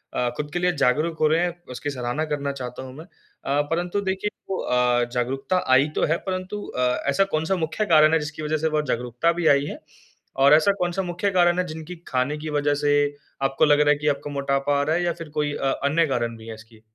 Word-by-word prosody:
अ, 125 Hz, -, +1 dB
खुद 150 Hz, 0 st, -3 dB
के 175 Hz, -, 0 dB
लिए 180 Hz, 0 st, +2 dB
जागरूक 155 Hz, +6 st, +1 dB
हो 155 Hz, -, +4 dB
रहे 160 Hz, +2 st, +2 dB
हैं 175 Hz, 0 st, -3 dB
उसकी 145 Hz, +4 st, -4 dB
सराहना 125 Hz, +3 st, -2 dB
करना 145 Hz, -2 st, -2 dB
चाहता 130 Hz, -1 st, -7 dB
हूँ 130 Hz, -1 st, -9 dB
मैं। 160 Hz, -, -10 dB
अ, 145 Hz, -6 st, -4 dB
परंतु 175 Hz, +4 st, -1 dB
देखिए 190 Hz, +1 st, -2 dB, 0.4 s
अ, 125 Hz, -1 st, +3 dB
जागरूकता 135 Hz, +8 st, -1 dB
आई 135 Hz, +3 st, +5 dB
तो -, -, +2 dB
है 170 Hz, -, +3 dB
परंतु 185 Hz, +2 st, -4 dB
अ, 125 Hz, 0 st, 0 dB
ऐसा 170 Hz, +8 st, +3 dB
कौन-सा 160 Hz, +5 st, 0 dB
मुख्य 165 Hz, +5 st, -2 dB
कारण 155 Hz, -4 st, +5 dB
है 160 Hz, -, +4 dB
जिसकी 150 Hz, +1 st, -6 dB
वज़ह 155 Hz, +1 st, 0 dB
से 160 Hz, +1 st, 0 dB
बहुत 150 Hz, -1 st, 0 dB
जागरूकता 125 Hz, +7 st, 0 dB
भी 170 Hz, -1 st, 0 dB
आई 140 Hz, -1 st, +4 dB
है? -, -, -6 dB, 0.6 s
और 140 Hz, +2 st, +6 dB
ऐसा 160 Hz, +6 st, +5 dB
कौन-सा 175 Hz, +1 st, 0 dB
मुख्य 175 Hz, +3 st, -1 dB
कारण 175 Hz, -1 st, +3 dB
है 180 Hz, -, +1 dB
जिनकी 160 Hz, +2 st, -7 dB
खाने 130 Hz, +4 st, -1 dB
की 155 Hz, +1 st, -6 dB
वज़ह 145 Hz, 0 st, +1 dB
से 145 Hz, -, +2 dB, 0.5 s
आपको 135 Hz, +3 st, +2 dB
लग 145 Hz, -1 st, +4 dB
रहा 150 Hz, 0 st, +4 dB
है 150 Hz, -, +5 dB
कि 150 Hz, +1 st, -3 dB
आपको 145 Hz, 0 st, -1 dB
मोटापा 140 Hz, 0 st, 0 dB
आ 140 Hz, -, +2 dB
रहा 155 Hz, +2 st, +1 dB
है? 175 Hz, -, 0 dB
या 175 Hz, -1 st, 0 dB
फिर 165 Hz, -2 st, -9 dB
कोई 145 Hz, -1 st, 0 dB
अ, 135 Hz, 0 st, 0 dB
अन्य 160 Hz, +4 st, +3 dB
कारण 120 Hz, -4 st, -1 dB
भी 110 Hz, -, -13 dB
है 115 Hz, -, -6 dB
इसकी? 110 Hz, 0 st, -17 dB
150 Hz, 235 wpm, -24 LUFS, 135-170 Hz, 0.6 s, और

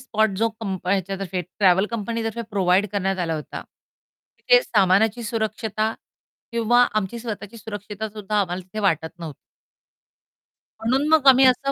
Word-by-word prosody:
Spot 220 Hz, -4 st, +1 dB
जो 225 Hz, +1 st, +2 dB
कंप 190 Hz, -4 st, -5 dB
ह्याच्यातर्फे 190 Hz, -1 st, -1 dB
travel 190 Hz, +2 st, +2 dB
कंपनीतर्फे 230 Hz, +1 st, -3 dB
प्रोव्हाईड 195 Hz, 0 st, +2 dB
करण्यात 195 Hz, -1 st, -1 dB
आला 165 Hz, -1 st, -2 dB
होता. 150 Hz, -, -6 dB, 0.8 s
तिथे -, -, +4 dB
सामानाची 205 Hz, -, +2 dB
सुरक्षता 220 Hz, -1 st, -2 dB, 0.6 s
किंवा 235 Hz, +1 st, +3 dB
आमची 215 Hz, +2 st, -1 dB
स्वतःची 220 Hz, -1 st, -7 dB
सुरक्षितता 210 Hz, 0 st, -6 dB
सुद्धा 210 Hz, 0 st, -2 dB
आम्हाला 180 Hz, -1 st, -3 dB
तिथे 185 Hz, +4 st, -9 dB
वाटत 165 Hz, -3 st, -1 dB
नव्ह 165 Hz, -3 st, -6 dB, 1.5 s
म्हणून 260 Hz, +6 st, +1 dB
मग 310 Hz, -4 st, +4 dB
आम्ही 265 Hz, 0 st, +8 dB
असं 275 Hz, +2 st, +3 dB
210 Hz, 135 wpm, -23 LUFS, 190-230 Hz, 1.5 s, आम्ही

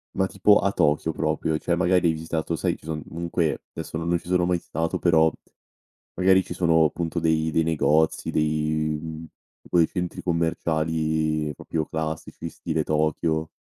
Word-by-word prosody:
Ma 95 Hz, -, +2 dB
tipo 100 Hz, +2 st, +4 dB
a 100 Hz, -, +1 dB
Tokyo 75 Hz, -5 st, +1 dB
proprio, 80 Hz, -, -1 dB
cioè 85 Hz, -, 0 dB
magari 90 Hz, 0 st, +3 dB
hai 80 Hz, -, +3 dB
visitato 80 Hz, +1 st, -3 dB
sai, -, -, -1 dB
ci -, -, -20 dB
son 80 Hz, -1 st, -4 dB
comunque 85 Hz, -1 st, -2 dB
adesso -, -, -5 dB
no 80 Hz, -, -4 dB
non 85 Hz, +1 st, +2 dB
ci -, -, -17 dB
sono 90 Hz, -1 st, +2 dB
mai 90 Hz, 0 st, +2 dB
stato, 80 Hz, 0 st, -2 dB
però 80 Hz, -2 st, +4 dB, 0.8 s
magari 95 Hz, +1 st, +4 dB
ci -, -, -7 dB
sono 80 Hz, -3 st, +3 dB
punto 85 Hz, +1 st, -3 dB
dei 80 Hz, -1 st, +1 dB
dei 80 Hz, +1 st, +2 dB
negozi 80 Hz, 0 st, +1 dB
dei 75 Hz, 0 st, 0 dB
mhmm, 80 Hz, 0 st, -7 dB, 0.4 s
quei 85 Hz, -2 st, +4 dB
centri 90 Hz, -2 st, -4 dB
commerciali 80 Hz, -2 st, 0 dB
proprio 80 Hz, +3 st, -3 dB
classici, 80 Hz, 0 st, -4 dB
stile 80 Hz, -, -2 dB
Tokyo, 80 Hz, +1 st, 0 dB
80 Hz, 165 wpm, -24 LUFS, 80-85 Hz, 0.8 s, tipo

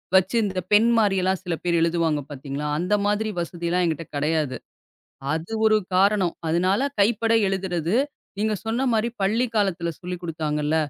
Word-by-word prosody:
வச்சு 190 Hz, +4 st, +3 dB
இந்த 185 Hz, -2 st, -2 dB
பெண் 215 Hz, +3 st, +6 dB
மாரில்லாம் 190 Hz, -3 st, +2 dB
சில 175 Hz, -2 st, -2 dB
பேர் 170 Hz, -1 st, +1 dB
எழுதுவாங்க 165 Hz, -3 st, +1 dB
பாத்தீங்களா. 140 Hz, +1 st, -5 dB
அந்த 180 Hz, +4 st, 0 dB
மாரி 210 Hz, +1 st, +1 dB
வசதிலாம் 175 Hz, +1 st, -1 dB
எங்கிட்ட 165 Hz, -1 st, -2 dB
கிடையாது. 150 Hz, -2 st, 0 dB, 0.8 s
அது 160 Hz, +6 st, -5 dB
ஒரு 215 Hz, -, +5 dB, 0.2 s
காரணம். 195 Hz, -2 st, +3 dB
அதனால 185 Hz, +6 st, +2 dB, 0.2 s
கைப்பட 225 Hz, +2 st, +2 dB, 0.2 s
எழுதுறது. 180 Hz, -2 st, -1 dB, 0.4 s
நீங்கச் 215 Hz, -1 st, -1 dB
சொன்ன 245 Hz, +4 st, 0 dB
மாரி 220 Hz, +1 st, +1 dB
பள்ளி 225 Hz, +6 st, +2 dB
காலத்துல 175 Hz, -5 st, 0 dB
சொல்லிக் 180 Hz, -1 st, -6 dB
குடுத்தாங்கள்ல. 155 Hz, -2 st, -1 dB
180 Hz, 145 wpm, -24 LUFS, 165-205 Hz, 0.8 s, பெண்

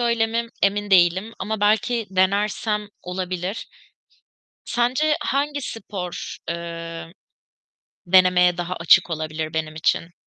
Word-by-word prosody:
öyle 235 Hz, -2 st, +2 dB
mi 230 Hz, +1 st, -2 dB
emin 205 Hz, +1 st, +1 dB
değilim 185 Hz, +4 st, +4 dB
ama 210 Hz, +2 st, -3 dB
belki 215 Hz, +2 st, +2 dB
denersem 205 Hz, +2 st, 0 dB
olabilir. 180 Hz, +2 st, -4 dB, 1.0 s
Sence 260 Hz, +6 st, +1 dB
hangi 285 Hz, +1 st, -1 dB
spor, 195 Hz, -6 st, -6 dB
eee, 170 Hz, 0 st, -6 dB, 1.0 s
denemeye 180 Hz, -1 st, +5 dB
daha 175 Hz, +1 st, -3 dB
açık 175 Hz, +2 st, +5 dB
olabilir 155 Hz, 0 st, -4 dB
benim 155 Hz, -1 st, -3 dB
için? 165 Hz, +1 st, 0 dB
190 Hz, 105 wpm, -22 LUFS, 170-220 Hz, 1.0 s, denemeye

